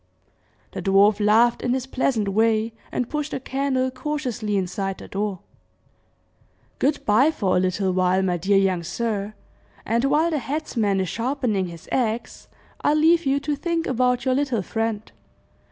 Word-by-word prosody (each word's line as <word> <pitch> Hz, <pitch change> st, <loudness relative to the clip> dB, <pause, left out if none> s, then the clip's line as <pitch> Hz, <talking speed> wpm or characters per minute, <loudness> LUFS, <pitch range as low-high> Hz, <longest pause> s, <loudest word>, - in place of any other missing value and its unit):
The -, -, -5 dB
dwarf 200 Hz, +2 st, +4 dB
laughed 230 Hz, +3 st, +4 dB
in 245 Hz, +1 st, 0 dB
his 260 Hz, -1 st, -3 dB
pleasant 255 Hz, -5 st, 0 dB
way, 220 Hz, +2 st, +1 dB, 0.2 s
and 250 Hz, -, -2 dB
pushed 300 Hz, +1 st, -3 dB
the -, -, -4 dB
candle 260 Hz, -1 st, -1 dB
cautiously 250 Hz, -7 st, -3 dB
inside 195 Hz, +1 st, -2 dB
the -, -, -11 dB
door. 200 Hz, -2 st, -3 dB, 1.4 s
"Good 285 Hz, +2 st, 0 dB
by 225 Hz, +8 st, +4 dB
for 200 Hz, -12 st, 0 dB
a -, -, +4 dB
little 185 Hz, +1 st, 0 dB
while, 185 Hz, +1 st, +2 dB
my 180 Hz, -2 st, 0 dB
dear 195 Hz, +4 st, +2 dB
young 190 Hz, -3 st, +2 dB
sir, 210 Hz, +3 st, -3 dB, 0.5 s
and 235 Hz, +3 st, +1 dB
while 305 Hz, +5 st, +2 dB
the 305 Hz, -, 0 dB
headsmen 230 Hz, -7 st, -1 dB
is 185 Hz, -, -2 dB
sharpening 230 Hz, -6 st, -1 dB
his 170 Hz, -2 st, -11 dB
axe, 235 Hz, -2 st, -2 dB, 0.4 s
I'll 295 Hz, -, +3 dB
leave 325 Hz, 0 st, +4 dB
you 275 Hz, +1 st, +2 dB
to 290 Hz, +1 st, -1 dB
think 330 Hz, +3 st, -2 dB
about 250 Hz, 0 st, +1 dB
your 260 Hz, -, +2 dB
little 260 Hz, -6 st, 0 dB
friend. 225 Hz, 0 st, -3 dB
230 Hz, 160 wpm, -23 LUFS, 195-270 Hz, 1.4 s, dwarf